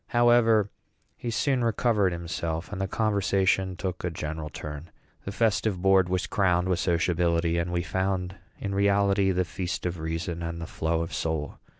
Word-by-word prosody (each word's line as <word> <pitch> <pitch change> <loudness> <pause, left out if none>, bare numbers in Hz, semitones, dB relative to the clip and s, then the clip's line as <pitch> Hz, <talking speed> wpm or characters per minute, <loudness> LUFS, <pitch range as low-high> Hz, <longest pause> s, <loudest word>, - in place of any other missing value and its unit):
However, 120 -3 +4 0.4
he 120 - -5
soon 125 +2 +1
recovered 110 -3 +2
himself, 85 0 -4
and 100 -2 -4
the 95 - 0
conversation 95 -3 +1
took 90 0 -4
a 90 - 0
general 80 -1 -5
turn. 75 +2 -7 0.4
The 100 - -3
festive 105 -2 +1
board 95 -1 +4
was 90 -1 0
crowned 90 -1 +1
with 90 -2 +1
sociability, 85 -1 +1
and 85 +1 -2
we 85 0 0
found 95 +2 -1 0.2
in 100 - -3
reality 100 0 +3
"the 90 -1 +1
feast 85 +4 -4
of 90 -1 -2
reason 80 +2 -3
and 85 0 -4
the 80 - -5
flow 80 +1 -1
of 85 - -7
soul." 80 -3 -3
90 Hz, 170 wpm, -27 LUFS, 85-100 Hz, 0.4 s, However